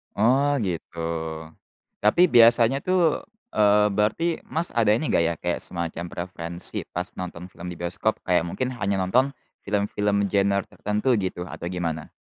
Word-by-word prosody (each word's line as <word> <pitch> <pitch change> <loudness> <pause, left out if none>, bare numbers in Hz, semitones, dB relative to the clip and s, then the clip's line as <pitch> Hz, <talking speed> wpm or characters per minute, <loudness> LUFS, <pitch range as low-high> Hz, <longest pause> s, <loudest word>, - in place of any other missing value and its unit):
Oh 135 +6 +3
gitu. 85 -4 -4 1.0
Tapi 170 +13 +5
biasanya 120 0 +5
tuh, 180 -4 +2 0.3
eee, 105 0 +4
berarti, 135 +12 0
Mas, 165 +2 -3
ada 110 -3 +3
ini 120 +8 +1
enggak - - +2
ya, 85 +1 +1
kayak 90 0 -2
semacam 85 -1 -2
preferensi 85 -1 +1
pas 90 +1 -3
nonton 90 -1 -7
film 90 -1 -9
di 85 - -10
bioskop, 90 +5 -2
kayak 90 -2 +3
mungkin 125 +9 -3
hanya 100 -4 -1
nonton 125 +9 +2 0.3
film-film 100 0 0
genre 100 0 +1
tertentu 105 +5 0
gitu 95 -3 -3
atau 85 - -7
gimana? 85 -3 -4
100 Hz, 145 wpm, -24 LUFS, 90-120 Hz, 1.0 s, Tapi